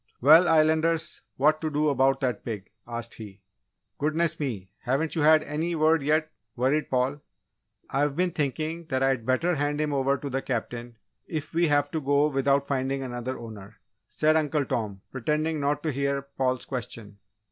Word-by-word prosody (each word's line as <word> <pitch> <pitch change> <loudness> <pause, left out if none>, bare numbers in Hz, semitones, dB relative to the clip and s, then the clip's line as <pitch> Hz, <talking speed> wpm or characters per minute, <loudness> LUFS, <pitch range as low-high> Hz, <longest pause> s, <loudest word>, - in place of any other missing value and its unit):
"Well, 160 +7 +7
Islanders! 160 0 +2 0.2
What 155 +3 +3
to 160 - -1
do 150 0 +1
about 135 -1 +2
that 125 -2 -1
pig?" 105 -5 -6 0.2
asked 115 -1 -5
he. 100 -3 -11 0.6
"Goodness 155 +2 0
me! 110 -11 -4
Haven't 135 +5 -1
you 160 - -1
had 155 +1 +6
any 160 +4 -2
word, 160 0 +3
yet?" 155 +2 +1 0.2
worried 135 +5 +1
Paul. 130 +3 0 0.7
"I've 140 +1 0
been 180 +2 +1
thinking 155 +2 -2
that 130 -4 -1
I'd 130 -4 +1
better 165 +8 +2
hand 145 -1 -1
him 150 -1 0
over 135 0 +1
to 140 - -6
the 135 0 -2
Captain, 120 -1 -4 0.3
if 155 -1 -5
we 170 +1 +3
have 145 -1 +2
to 160 - -2
go 145 +2 +3
without 140 0 +2
finding 135 0 -1
another 125 0 -4
owner," 110 -2 -10 0.3
said 155 +1 +2
Uncle 150 -2 +1
Tom, 105 -6 -3
pretending 150 +4 -1
not 145 +1 0
to 155 - 0
hear 140 0 -1
Paul's 130 -2 -2
question. 115 -5 -6
140 Hz, 170 wpm, -26 LUFS, 130-155 Hz, 0.7 s, Well